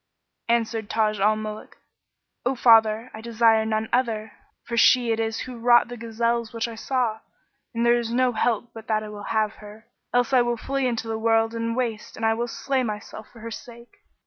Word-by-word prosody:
Answered 225 -2 0
Taj 215 -2 +1
al 210 +2 +3
Muluk, 215 0 -7 0.7
"O 245 - +1
my 265 - -1
father, 225 0 +4
I 220 - -8
desire 225 -1 +3
none 220 0 -1
other, 225 -4 0 0.3
for 235 - -5
she 240 0 +5
it 225 - 0
is 225 0 -2
who 250 -2 -7
wrought 240 0 +5
the 245 - -6
gazelles 235 0 -2
which 230 0 -2
I 230 - -7
saw, 230 -1 -1 0.6
and 230 +1 +1
there 240 0 +4
is 230 -1 -4
no 250 +1 +2
help 235 0 -1
but 225 -1 -11
that 215 -1 0
I 210 -1 -8
have 215 -1 0
her; 210 +1 -13 0.3
else 245 +1 +1
I 255 - +6
will 240 0 0
flee 270 +2 -1
into 230 -2 -2
the 220 0 -3
world 225 0 +2
and 230 0 -2
the - - -6
waste 230 -4 -3
and 225 - -2
I 225 - +4
will 235 +2 -2
slay 270 +2 -1
myself 215 -1 -6
for 230 - -15
her 230 +1 -7
sake." 235 +1 -11
230 Hz, 210 wpm, -24 LUFS, 220-240 Hz, 0.7 s, I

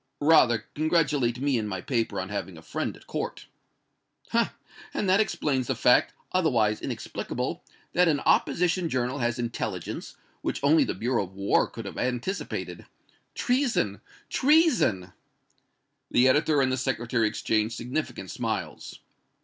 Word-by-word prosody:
"Rather 125 -8 +4
congratulate 150 -6 +1
me 135 -3 +1
and 105 -1 -3
my 95 -2 -3
paper 115 +3 -1
on 95 +1 -4
having 100 -4 -4
a 80 - -13
friend - - -3
at - - -19
court." - - -4 0.9
"Ha! - - +1 0.4
and 200 - 0
that 190 +2 +4
explains 140 - 0
the 135 - 0
fact, 125 +2 +4 0.2
otherwise 120 -12 +2
inexplicable, - - -4 0.3
that 180 +1 +4
an 150 -3 +2
opposition 175 0 +2
journal 130 +1 -1
has 120 -1 0
intelligence, 115 -6 -4 0.2
which - - -2
only 155 +3 +5
the - - -2
Bureau 120 -3 0
of 95 +1 -16
War 100 +1 +2
could - - -9
have - - -6
anticipated! 125 +10 -3 0.5
Treason 250 0 0 0.3
treason!" 260 - +3 1.0
The 125 +2 +4
editor 145 +2 +3
and 130 - +1
the 130 - 0
Secretary 120 -3 0
exchanged 110 +1 0
significant 125 - -4
smiles. - - -4
125 Hz, 140 wpm, -27 LUFS, 115-155 Hz, 1.0 s, only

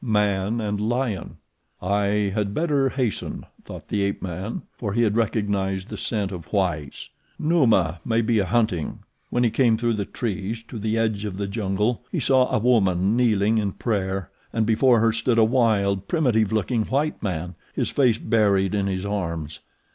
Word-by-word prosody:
Man 105 -1 +1
and 105 -2 -2
lion. 115 -3 -2 0.4
"I 100 +1 +1
had 105 -1 -1
better 145 -5 +2
hasten," 125 -6 -3 0.2
thought - - -10
the 105 - 0
ape 100 0 -1
man, 95 +4 -4
for 105 -4 -4
he 120 +2 +2
had 105 -2 +1
recognized 100 -3 -1
the - - -5
scent 105 -4 -2
of 85 -3 -8
whites. 85 -8 -2 0.3
"Numa 115 - +2
may 115 0 +1
be 115 -1 +2
a 100 - +1
hunting." 100 -7 0 0.3
When 120 - +1
he 115 - +2
came 115 -3 +3
through 120 0 0
the 105 -2 -2
trees 110 +1 -4
to 115 - -6
the 110 +2 -1
edge 110 -2 0
of 100 -3 -4
the 100 - -2
jungle 105 +3 -1
he - - -1
saw 130 -1 +3
a - - +2
woman 105 -4 +2
kneeling 110 -3 +3
in 100 -3 -1
prayer, 95 -4 -2 0.2
and 115 -1 0
before 115 +2 +4
her 115 0 +4
stood 115 +1 +1
a 115 - +6
wild, 105 -5 +2
primitive 120 - +2
looking 110 +1 0
white 145 +3 -1
man, 90 -3 -3 0.2
his - - 0
face 125 -6 +3
buried 100 -4 +2
in 100 -1 0
his 95 0 -2
arms. 85 -7 -3
105 Hz, 180 wpm, -24 LUFS, 95-115 Hz, 0.4 s, a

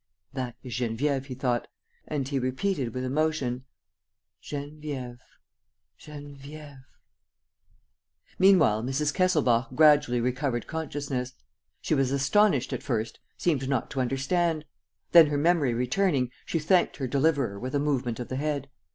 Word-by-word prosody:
"That 125 -3 -4
is 125 -3 -7
Geneviève," 130 +3 -1
he 130 -2 -7
thought. 125 -2 -1 0.4
And 140 -3 -2
he 140 -1 -1
repeated 130 +1 -1
with 130 - -2
emotion, 135 -2 -1 0.8
"Geneviève... 145 -4 -6 0.8
Geneviève... 145 -1 -11 0.8
." - - -37
Meanwhile, 180 - +5
Mrs. 135 +4 -1
Kesselbach 130 -10 +2
gradually 150 -5 +5
recovered 125 0 -1
consciousness. 140 -5 -4 0.5
She - - -1
was 135 -1 +2
astonished 140 - +2
at - - -3
first, 115 -5 -3 0.2
seemed 135 -6 0
not 135 -4 -1
to 135 - -1
understand. 155 +5 0 0.5
Then, 165 -2 +9
her 145 0 -1
memory 150 -5 +2
returning, 125 +1 +1 0.2
she - - 0
thanked 175 +4 +2
her 135 - -2
deliverer 135 -6 +1
with 130 +5 -4
a - - +2
movement 130 -5 -1
of 125 - -6
the 130 - -3
head. 145 -1 -2
140 Hz, 135 wpm, -27 LUFS, 125-150 Hz, 0.8 s, Then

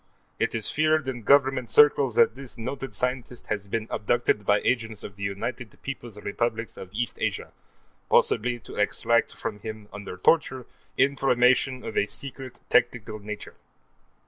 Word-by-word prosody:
It - - 0
is 110 -2 -1
feared 155 -2 +2
in 125 -2 -3
Government 135 0 +3
circles 140 -5 +5
that 115 - +5
this 130 -1 -10
noted 130 0 -5
scientist 125 +1 -2
has 100 -2 -2
been 110 +2 -2
abducted 105 -2 0
by 105 0 +5
agents 115 -4 -1
of 95 - -8
the 100 - -14
United 100 +4 -4
Peoples' 120 -6 -6
Republics 115 +2 -2
of 95 - -9
East 115 +3 -2
Asia, - - -2 0.6
possibly 120 +2 +3
to - - -11
extract 115 +2 +1
from 105 -2 -5
him, 110 -1 -8
under 100 -3 -7
torture, 130 - +2 0.3
information 130 -1 +3
of - - -5
a 100 - +2
secret 135 0 -8
technical 110 - +1
nature. 105 0 -7
120 Hz, 150 wpm, -26 LUFS, 105-130 Hz, 0.6 s, circles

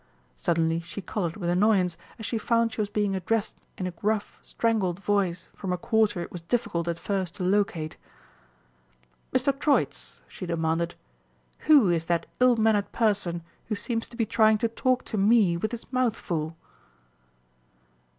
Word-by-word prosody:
Suddenly 165 -1 +1
she 170 +4 -8
coloured 180 -4 -3
with 175 -4 -1
annoyance 185 -2 +3 0.2
as 220 - -7
she 225 0 -1
found 230 0 +1
she 220 - -1
was 205 - -2
being 205 -2 0
addressed 205 +3 -1 0.2
in 185 - -3
a 185 - -2
gruff, 210 +4 -2
strangled 205 -6 0
voice 195 -4 0
from 190 - -4
a 180 - 0
quarter 220 -1 +1
it - - -6
was 175 - -7
difficult 175 -3 -1
at 170 -1 -1
first 190 -2 -2
to 185 - -4
locate. 185 -5 0 1.3
"Mr. 260 +2 +2
Troitz," 290 -1 0
she 185 - -8
demanded, 165 0 -1 0.7
"who 280 -11 +7
is 165 -1 0
that 170 0 0
ill 250 -1 +5
mannered 220 -2 +2
person 200 -7 0 0.2
who 215 - -1
seems 225 +3 -2
to 235 - -13
be 230 - +2
trying 220 0 +4
to 230 +2 +1
talk 255 +3 0
to 215 - -2
Me 205 -3 +4
with 215 +7 -2
his 235 -1 -6
mouth 255 -3 +2
full?" 160 -5 -3
200 Hz, 165 wpm, -27 LUFS, 175-225 Hz, 1.3 s, who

